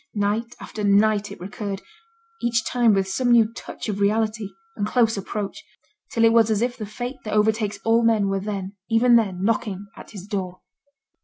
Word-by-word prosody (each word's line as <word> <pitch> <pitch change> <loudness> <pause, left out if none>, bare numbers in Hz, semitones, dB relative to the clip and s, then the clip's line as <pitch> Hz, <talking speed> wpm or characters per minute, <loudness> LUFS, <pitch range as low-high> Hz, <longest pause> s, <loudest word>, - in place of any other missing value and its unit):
Night 215 +4 -1
after 215 - -6
night 205 +1 +3
it - - -9
recurred; 195 +1 -5 0.6
each 235 -1 +1
time 235 -4 +3
with 195 -1 +1
some 245 +5 0
new 230 -1 +5
touch - - -8
of 205 -2 -3
reality, 215 0 0 0.3
and 205 -1 -1
close 225 -1 +2
approach; 200 0 -5 0.5
till 230 - +1
it 225 - +5
was 225 -1 +5
as 215 0 +1
if 245 0 -1
the 215 - -6
fate 245 +5 -5
that 215 - -3
overtakes 210 -1 +1
all 225 +1 +4
men 220 -3 +3
were 195 0 0
then, 195 -1 -5
even 240 +2 +5
then, 195 -5 +1
knocking 205 -2 -1
at - - -12
his 195 -3 -9
door. 185 -3 -4
215 Hz, 185 wpm, -23 LUFS, 200-230 Hz, 0.6 s, new